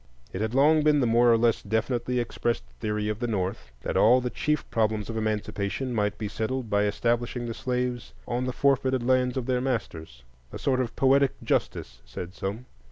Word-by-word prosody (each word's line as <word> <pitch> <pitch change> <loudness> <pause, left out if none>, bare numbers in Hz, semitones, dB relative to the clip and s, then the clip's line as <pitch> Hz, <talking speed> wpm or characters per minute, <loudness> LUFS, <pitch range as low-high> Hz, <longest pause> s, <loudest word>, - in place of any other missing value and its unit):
It 95 - -3
had 110 +2 -2
long 150 +3 +5
been 150 -1 +4
the 130 - +2
more 120 +1 +4
or 115 - +5
less 115 0 +2
definitely 120 +4 -1
expressed 120 - -2 0.2
theory 105 0 -2
of 105 0 -2
the 120 - -1
North 90 - -3
that - - -3
all 125 +3 +6
the 125 -1 -3
chief 150 -1 -1
problems 110 -1 0
of - - -6
Emancipation 110 +3 -2
might 105 -2 0
be 105 - -3
settled 110 +2 -3
by 100 0 +3
establishing 120 +3 -1
the 115 - -4
slaves 125 -1 -3
on 125 +1 -1
the 130 - -1
forfeited 130 -1 +1
lands 125 0 +2
of 130 - -2
their 125 -1 0
masters,—a 65 - -5
sort 130 -2 0
of 120 -2 -4
poetic 135 0 +4
justice, - - -2
said 75 +9 -8
some. 100 +5 -5
115 Hz, 190 wpm, -26 LUFS, 105-125 Hz, 0.2 s, all